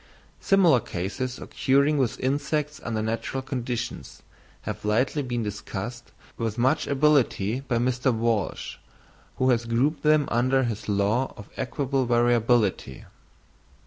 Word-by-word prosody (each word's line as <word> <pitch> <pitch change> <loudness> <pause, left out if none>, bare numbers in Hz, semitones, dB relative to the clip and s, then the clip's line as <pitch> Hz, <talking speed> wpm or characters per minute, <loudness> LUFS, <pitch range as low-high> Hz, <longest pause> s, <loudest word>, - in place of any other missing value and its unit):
Similar 180 -9 +4
cases 115 +7 -4
occurring 140 +2 +1
with 125 -4 0
insects 150 +3 -1
under 110 -2 -2
natural 115 +4 -3
conditions 125 -3 -5 0.4
have - - -6
lately 120 +8 +1
been 120 -3 -2
discussed 105 +3 -6 0.3
with 115 -1 -2
much 130 +6 +2
ability 135 -6 +2
by 135 -3 -2
Mr. 125 +2 +1
Walsh, 115 -3 -1 0.6
who 130 0 +2
has 120 -1 +1
grouped 130 +7 +1
them 150 -1 +3
under 130 +3 +2
his 110 -3 -4
law 105 +6 +1
of 105 - -11
equable 135 0 -1
variability. 120 - +1
125 Hz, 120 wpm, -25 LUFS, 115-135 Hz, 0.6 s, Similar